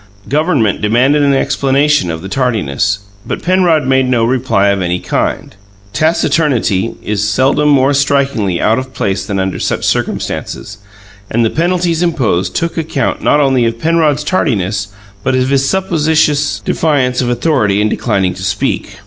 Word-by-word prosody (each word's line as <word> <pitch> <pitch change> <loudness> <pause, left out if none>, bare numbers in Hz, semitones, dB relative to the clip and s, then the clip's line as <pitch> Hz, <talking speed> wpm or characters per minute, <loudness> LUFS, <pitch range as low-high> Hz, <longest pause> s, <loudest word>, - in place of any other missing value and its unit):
Government 145 - +1
demanded 125 +7 +2
an 140 -1 +3
explanation 140 -5 +1
of 80 0 -5
the - - -5
tardiness; 100 - -1 0.2
but - - -5
Penrod 175 -4 +2
made 130 0 +2
no 120 -3 +2
reply 115 -5 +1
of 100 -1 0
any 90 0 -1
kind. - - -3 0.4
Taciturnity 135 - +1
is 105 0 -1
seldom 135 +7 +2
more 140 0 +3
strikingly 135 -9 0
out 110 +3 +2
of 130 0 -8
place 95 -1 -1
than 100 - -2
under 95 -1 -2
such - - -2
circumstances, 105 +1 -3 0.5
and 115 +1 +1
the 110 - 0
penalties 170 0 0
imposed 130 - 0
took 170 0 -2
account 155 -3 -2
not 145 - +3
only 135 -4 +2
of 115 0 -1
Penrod's 155 0 +1
tardiness 105 - -1 0.4
but 130 - 0
of 130 0 +1
his 135 0 +1
supposititious 155 -5 +1
defiance 130 -6 +1
of 125 - -1
authority 120 -5 +1
in 105 - +2
declining 100 -5 0
to 95 - -10
speak. 100 +2 -2
130 Hz, 155 wpm, -13 LUFS, 105-150 Hz, 0.5 s, an